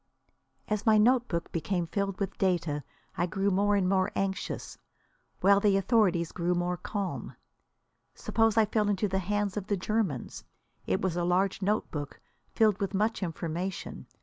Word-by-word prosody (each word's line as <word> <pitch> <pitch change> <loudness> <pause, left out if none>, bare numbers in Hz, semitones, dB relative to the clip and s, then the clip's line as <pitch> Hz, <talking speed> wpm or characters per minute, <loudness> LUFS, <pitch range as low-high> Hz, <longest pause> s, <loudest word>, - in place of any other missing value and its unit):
As 210 -1 -1
my 215 -1 +6
notebook 230 -6 +2
became 175 +1 -1
filled 195 +2 -2
with 195 -1 -3
data 170 -6 0 0.3
I 175 - 0
grew 195 +3 0
more 205 +2 +2
and 195 -2 +2
more 190 0 +2
anxious, 195 0 -3 0.6
while 200 +1 +6
the 200 -1 +3
authorities 195 -6 +2
grew 175 0 0
more 175 0 0
calm. 195 +2 -4 0.8
Suppose 225 -1 +1
I 220 - +6
fell 210 0 0
into 205 +1 +1
the 190 0 0
hands 205 +1 -1
of 200 -1 -4
the 205 - 0
Germans! 185 - -2 0.4
It 95 - 0
was 185 -3 0
a 175 - 0
large 185 +3 +1
notebook, 165 -8 -2 0.3
filled 215 -3 +3
with 195 0 -2
much 215 +3 0
information. 175 +1 -4
195 Hz, 155 wpm, -29 LUFS, 175-205 Hz, 0.8 s, my